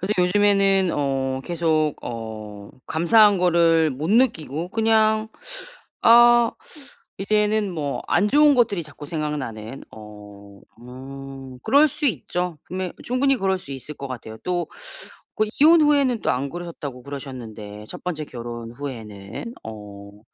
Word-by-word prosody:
근데 195 +3 -1
요즘에는 195 0 +3
어 135 -2 -1
계속 160 -3 0
어 110 -3 -7 0.2
감사한 200 +5 +4
거를 170 -2 +4
못 150 +7 -3
느끼고 175 - +1
그냥 220 0 +2 0.7
아 240 0 +7 0.7
이제는 210 0 +1
뭐 145 -4 -3
안 210 - +3
좋은 295 +2 +5
것들이 225 -8 +2
자꾸 145 -1 -11
생각나는. 135 -7 -5
어 105 -1 -12 0.5
음 135 +1 -10
그럴 285 +7 +5
수 300 +1 -2
있죠. 180 - -2
분명 185 -1 -4
충분히 265 +2 +2
그럴 190 -3 0
수 140 - -9
있을 135 +3 -8
것 140 - -7
같아요. 110 -3 -7
또 175 -1 -1 0.7
그 215 - +2
"이혼 320 +2 +7
후에는 280 -6 +3
또 - - +1
안 135 +2 -1
그러셨다."고 165 -7 -7
그러셨는데 115 -7 -8
첫 - - -9
번째 160 -4 -3
결혼 120 -2 -7
후에는 115 - -7
어. 105 -1 -10
160 Hz, 255 characters per minute, -23 LUFS, 125-210 Hz, 0.7 s, 아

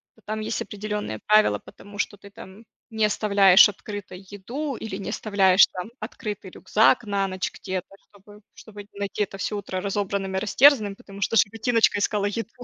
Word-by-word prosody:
то 225 - -24
там 215 +1 -4
есть 220 +1 -3
определенные 210 - -5
правила, 210 - +3
потому 205 0 -14
что 205 - -2
ты 200 +1 -14
там 205 0 -13 0.2
не 220 -2 +1
оставляешь 200 -2 +5
открытой 205 -2 -8
еду 250 +9 -5
или 215 -4 -6
не 200 - -6
оставляешь 195 -3 +4
там 180 +3 -7
открытый 210 -3 -7
рюкзак 225 +6 +2
на 200 -1 0
ночь 185 0 -3
где-то, 185 -2 -5 0.2
чтобы 205 +1 -18
чтобы 205 -2 -12
не 200 0 -16
найти 200 +1 -2
это 195 - -7
всё 210 +2 -3
утро 185 -2 -5
разобранным 195 -1 -2
и - - +1
растерзанным, 220 -1 +4
потому 200 0 -13
что 225 +4 +1
животиночка 225 +1 +2
искала 205 0 0
еду. 225 +3 -3
205 Hz, 175 wpm, -24 LUFS, 195-215 Hz, 0.2 s, оставляешь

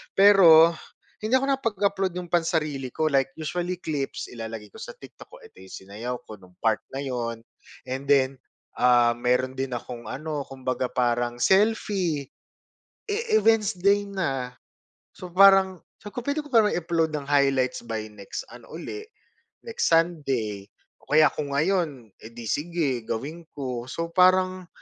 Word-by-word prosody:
pero 175 -5 +8 0.5
hindi 220 +3 -2
ako - - 0
nakapag-upload 200 -7 0
nung 180 -1 -6
pansarili 155 -6 -1
ko, 155 - 0
like 140 +4 +1
usually 175 +3 -3
clips, 145 -3 -4
ilalagay 115 -2 -7
ko - - -15
sa - - -8
TikTok - - -14
ko, - - -12
edi 95 - -15
sinayaw 110 +6 -6
ko 110 - -8
nung 95 -1 -19
part 110 -1 +1
na 135 - -3
yun, 120 -4 -4 0.5
and 130 +1 -4
then, 135 -1 +3 0.4
ah, 120 -1 +4
meron 125 +2 0
din 135 -1 -3
akong 120 0 -7
ano, 150 0 -4
kumbaga 130 -1 -3
parang 120 0 0
selfie. 190 - +1 0.8
Eh, 435 +1 +1
eh, - - +1
wednesday 205 -3 +3
na, 140 -11 -3 0.6
so 180 - -10
parang, 190 -1 +6 0.2
sabi 205 - -10
ko - - -6
puwede 285 +2 -1
ko - - -10
parang 225 -6 +4
i-upload 165 -1 0
ng 145 -2 -4
highlights 135 -3 +2
by 110 -2 -4
next 105 -2 -8
ano 120 -1 -14
uli, 295 - -7 0.6
next 470 0 -1
Sunday, 135 - 0 0.4
o - - -24
kaya 155 0 +7
kung 145 -2 -4
ngayon, 150 - 0 0.2
edi 115 +1 -10
sige 145 - -1
gawin 150 +9 -5
ko. 125 -4 -5
So, 165 +3 -3
parang, 185 0 +3
150 Hz, 150 wpm, -25 LUFS, 125-185 Hz, 0.8 s, pero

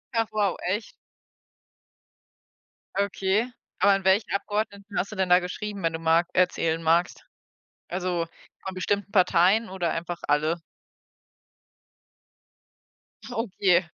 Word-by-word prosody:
Ach 225 -1 +2
wow, 205 -4 +1
echt? 205 +4 -2 2.1
Okay. 200 +3 +1 0.3
Aber 200 - +5
an 195 0 +2
welchen 195 +3 +3
Abgeordneten 200 0 -3
hast 200 - -1
du - - -6
denn 190 -2 0
da 180 0 +7
geschrieben, 200 +3 -5
wenn 165 0 +1
du 160 - -3
mag 165 +1 +3
erzählen 165 -3 +1
magst? 165 +2 +1 0.6
Also, 180 -2 -1 0.4
von 190 - -5
bestimmten 200 +2 -1
Parteien 190 +3 +4
oder 185 -3 -2
einfach 170 +1 -4
alle? 155 +3 +1 2.7
Okay. 190 -6 +2
190 Hz, 110 wpm, -26 LUFS, 175-205 Hz, 2.7 s, da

